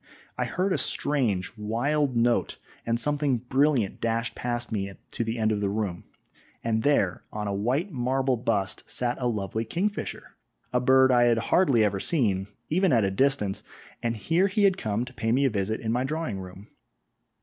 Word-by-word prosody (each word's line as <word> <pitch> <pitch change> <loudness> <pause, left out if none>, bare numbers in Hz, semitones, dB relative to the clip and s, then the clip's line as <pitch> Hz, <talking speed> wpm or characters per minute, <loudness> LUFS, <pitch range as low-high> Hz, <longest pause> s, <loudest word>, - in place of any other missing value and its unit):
I - - -1
heard 185 +1 0
a - - 0
strange, 115 -11 0
wild 125 +6 0
note, 120 0 +1 0.3
and 115 0 +1
something 145 0 +1
brilliant 130 -2 +1
dashed 115 0 -1
past 120 -1 -3
me 100 -2 -2 0.2
to - - -2
the 115 +1 -3
end 110 -1 +1
of 105 -1 -1
the 100 - 0
room, 100 -4 -3 0.6
and 110 -1 0
there, 110 -10 +1
on 105 -1 -4
a 100 - -1
white 130 - 0
marble 130 0 0
bust 110 -5 -1
sat 120 -1 0
a 125 - +1
lovely 110 -1 -2
kingfisher 195 - -3 0.4
a 125 - +3
bird 130 +1 +5
I 120 -1 +5
had 120 -1 +3 0.2
hardly 135 -12 +4
ever 100 -2 +1
seen, 100 - 0 0.2
even 185 +2 +2
at 115 -3 +4
a 95 - +1
distance, 105 -3 +1 0.4
and 115 -1 -1
here 165 - +2
he 205 +2 0
had 195 -2 +5
come 110 - -2
to 130 - -12
pay 115 -2 -1
me 135 +4 +3
a 135 - +2
visit 105 +1 -1
in 110 - -2
my 125 +2 +1
drawing 155 -7 -3
room. 95 +2 -10
120 Hz, 185 wpm, -26 LUFS, 105-140 Hz, 0.6 s, bird